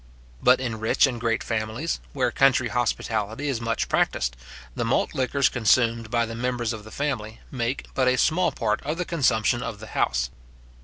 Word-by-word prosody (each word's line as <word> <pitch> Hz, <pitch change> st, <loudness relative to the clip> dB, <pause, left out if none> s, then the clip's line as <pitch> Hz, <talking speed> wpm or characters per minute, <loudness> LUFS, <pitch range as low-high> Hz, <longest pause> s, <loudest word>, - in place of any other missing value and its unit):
But 125 Hz, +1 st, +5 dB
in 120 Hz, -4 st, -3 dB
rich 110 Hz, +5 st, +3 dB
and 120 Hz, -4 st, -3 dB
great 115 Hz, 0 st, 0 dB
families, 115 Hz, +7 st, -2 dB
where 125 Hz, -3 st, 0 dB
country 130 Hz, -2 st, +3 dB
hospitality 110 Hz, +2 st, -1 dB
is 120 Hz, -4 st, -2 dB
much 115 Hz, 0 st, -1 dB
practised, -, -, +1 dB, 0.4 s
the -, -, -2 dB
malt -, -, +1 dB
liquors 135 Hz, +1 st, +2 dB
consumed 115 Hz, -1 st, +2 dB
by 120 Hz, 0 st, +1 dB
the 115 Hz, -, -6 dB
members 120 Hz, -1 st, -1 dB
of 110 Hz, -2 st, -7 dB
the 110 Hz, -, -11 dB
family 115 Hz, -5 st, -3 dB
make 125 Hz, 0 st, -2 dB
but 130 Hz, -1 st, +2 dB
a 125 Hz, 0 st, +3 dB
small 170 Hz, +7 st, +2 dB
part 110 Hz, -2 st, -1 dB
of 155 Hz, +3 st, -3 dB
the 180 Hz, -, -2 dB
consumption 120 Hz, -7 st, +2 dB
of 105 Hz, -, -5 dB
the 110 Hz, -, -8 dB
house. 60 Hz, -1 st, 0 dB
120 Hz, 185 wpm, -25 LUFS, 110-130 Hz, 0.4 s, But